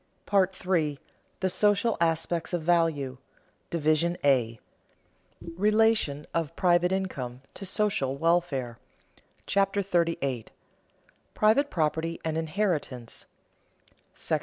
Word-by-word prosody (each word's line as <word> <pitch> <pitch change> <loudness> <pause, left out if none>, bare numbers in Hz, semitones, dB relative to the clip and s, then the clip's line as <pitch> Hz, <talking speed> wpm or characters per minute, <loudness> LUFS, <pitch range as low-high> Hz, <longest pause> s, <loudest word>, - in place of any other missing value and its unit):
PART 190 -2 +2
III 160 -6 +1 0.4
THE 190 - +2
SOCIAL 205 +3 +2
ASPECTS 165 +1 0
OF 175 -2 -1
VALUE 155 -6 +1 0.5
DIVISION 165 +2 +1
A 120 -5 +2 1.0
RELATION 210 -7 +2
OF 165 -4 -2
PRIVATE 175 0 +3
INCOME 135 -10 -3
TO 195 - -7
SOCIAL 190 -10 0
WELFARE 145 -7 0 0.7
CHAPTER 200 0 +1
38 165 - -1 0.9
PRIVATE 235 +7 +3
PROPERTY 160 +1 -1
AND 160 -1 -1
INHERITANCE 160 - -2 0.9
§ - - -8
I. - - +3
170 Hz, 100 wpm, -27 LUFS, 145-190 Hz, 1.0 s, PRIVATE